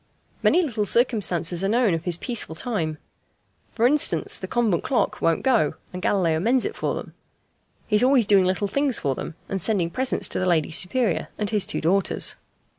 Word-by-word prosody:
Many 360 - +3
little 225 -9 -2
circumstances 185 -7 +1
are 195 - +1
known 230 -3 +2
of 165 0 -3
this 175 -2 +2
peaceful 230 -7 -1
time. 165 -6 -3 0.8
For 230 - +1
instance, 290 +4 +1
the - - -6
convent 225 -8 0
clock 260 - -1
won't 165 -1 +1
go, 235 - +2 0.2
and 180 - -6
Galileo 170 -5 +1
mends 240 +7 +2
it - - -4
for - - -2
them. - - -8 0.7
He 210 - +1
is 220 - +3
always 255 -3 +4
doing 195 -2 +4
little 185 +2 0
things 275 +3 +1
for 140 -3 -1
them, 155 - -7
and 195 -1 -3
sending 190 -4 +1
presents 260 +6 -1
to - - -2
the 185 - -1
Lady 160 -3 +1
Superior 190 +3 0
and 210 0 -2
his 210 -3 0
two - - -3
daughters. 190 +5 +1
200 Hz, 190 wpm, -23 LUFS, 170-240 Hz, 0.8 s, always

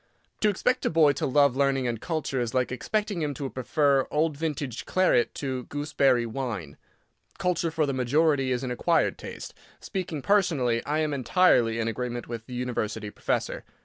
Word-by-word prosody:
To 215 - +3
expect 250 +6 0
a - - +2
boy 155 -3 +5
to 140 - -2
love 140 -1 +4
learning 135 -2 +1
and 115 -2 -3
culture 155 -6 -2
is 120 0 -3
like 125 -1 +1
expecting 205 - -2
him 145 -2 -2
to 140 +1 -4
prefer 140 +1 +1
old 155 0 +1
vintage 145 -5 -4
claret 185 -10 +2
to 130 -3 -3
gooseberry 145 -4 +1
wine. 110 - -4 0.6
Culture 175 -2 0
for 160 -1 0
the 140 - -1
majority 135 +1 +2
is 125 +1 -1
an 125 - -3
acquired 165 +7 +1
taste. - - -8 0.3
Speaking 175 - -4
personally, 150 - +2
I 155 +2 +1
am 155 -1 0
entirely 130 -5 +3
in 115 -1 -1
agreement 120 +1 -3
with 115 -1 -7
the 125 - -7
University 110 -4 -3
professor. - - -2
135 Hz, 175 wpm, -27 LUFS, 125-155 Hz, 0.6 s, boy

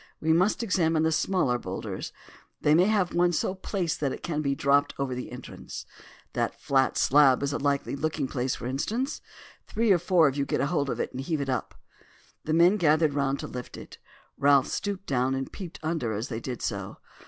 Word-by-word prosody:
We 160 +1 +2
must 185 +7 +2
examine 165 -6 +2
the 160 - +2
smaller 160 -7 +1
boulders. - - -5 0.5
They 150 - +3
may 175 +4 +5
have 205 -5 +1
one 175 0 +3
so 185 - 0
placed 185 -3 -3
that 140 -3 0
it - - -7
can 155 -3 -2
be 140 -2 0
dropped 140 +1 +2
down 140 - 0
over 130 -2 -3
the 125 -1 -6
entrance. 125 - -8 0.5
That - - -2
flat 135 -1 +1
slab 140 -1 +5
is 140 0 -1
a - - -1
likely 140 0 0
looking 150 -1 -2
place, 130 -1 -2
for - - -8
instance. 220 - -2 0.5
Three 225 -1 +1
or 180 - +5
four 175 -2 +4
of 135 - -1
you 140 - 0
get - - -1
hold 140 -1 0
of - - -3
it - - -2
and 130 - -5
heave 155 +2 -2
it 140 -1 -3
up." 125 -3 -2 0.7
The 155 - 0
men 175 +5 +5
gathered 155 -3 +3
round 140 -1 0
to - - -5
lift 125 -1 -7
it. - - -11 0.4
Ralph 140 -1 +4
stooped 200 -1 -3
down 130 0 +1
and 135 0 -4
peeped 180 -5 -8
under 155 -8 -1
as 110 +5 -4
they 115 -3 -3
did 125 0 -6
so. - - -4
145 Hz, 210 wpm, -27 LUFS, 135-175 Hz, 0.7 s, may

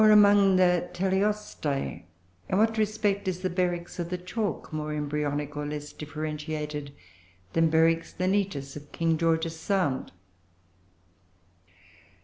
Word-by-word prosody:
Or 215 - +7
among 205 -2 +7
the 180 -1 +3
Teleostei 190 - -1 0.4
in - - +1
what 220 +1 +3
respect 210 -2 0
is 185 -1 -2
the 185 -1 -1
Beryx 175 -1 -1
of 170 -1 -2
the 180 - -2
Chalk 185 -1 -3
more 155 0 -3
embryonic, 150 0 -2
or 150 - -3
less 150 0 -5
differentiated, 150 -1 -4 0.6
than 165 0 +4
Beryx 165 +1 +2
lineatus 185 -7 0
of 145 0 -10
King 165 -1 +1
George's 165 0 +1
Sound? 180 -9 0
165 Hz, 125 wpm, -28 LUFS, 150-195 Hz, 0.6 s, Or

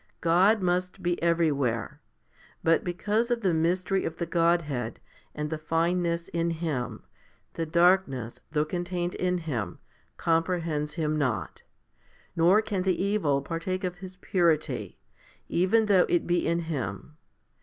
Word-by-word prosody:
God 190 +5 +4
must 180 0 -1
be 175 0 0
everywhere; 150 -9 0 0.6
but 165 0 +3
because 210 +6 0
of 240 -1 0
the 185 -5 +2
mystery 180 +4 +1
of 165 - -4
the 170 - -2
Godhead 165 -9 0 0.4
and 150 +1 -3
the 160 - -2
fineness 170 +2 0
in 170 0 0
Him, 160 -7 -3 0.5
the 165 -1 -3
darkness, 170 -8 +2
though 150 -1 +1
contained 175 +1 -3
in 180 0 0
Him, 120 - -4 0.4
comprehends 165 -3 0
Him 155 -2 0
not; 130 -6 -2 0.7
nor 180 +6 +5
can 200 -3 -2
the 185 -1 0
evil 185 -9 +1
partake 170 +5 -3
of 180 -1 -3
His 185 0 -9
purity, 170 -4 0 0.5
even 190 +6 +3
though 195 -3 +4
it 175 - +2
be 175 0 +1
in 170 +1 +1
Him. 150 - -5
170 Hz, 135 wpm, -27 LUFS, 155-180 Hz, 0.7 s, nor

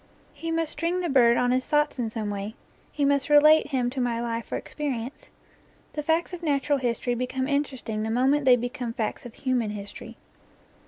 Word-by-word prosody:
He 330 - -6
must 325 -1 0
string 335 +4 -1
the 350 - -1
bird 240 -4 +5
on 245 0 +2
his 255 0 0
thoughts 295 -2 +1
in 230 -2 -1
some 220 -2 -3
way; 205 +2 -5 0.4
he 290 - 0
must 280 +1 +1
re 295 - +7
late 305 +1 +6
him 255 -4 0
to 260 0 -3
my 235 -2 0
life 230 -1 -4
or - - -1
experience. 265 -4 -5 0.6
The 300 - -2
facts 325 +4 0
of 355 - -6
nat 285 -5 0
ural 290 -2 +2
history 245 0 -1
become 255 +2 -2
interesting 270 -6 -2
the 220 - -2
moment 265 +5 +2
they 255 -1 +7
become 245 0 -4
facts 225 +1 -3
of 235 - -14
human 250 -5 0
history. 205 -1 -8
260 Hz, 205 wpm, -26 LUFS, 235-295 Hz, 0.6 s, re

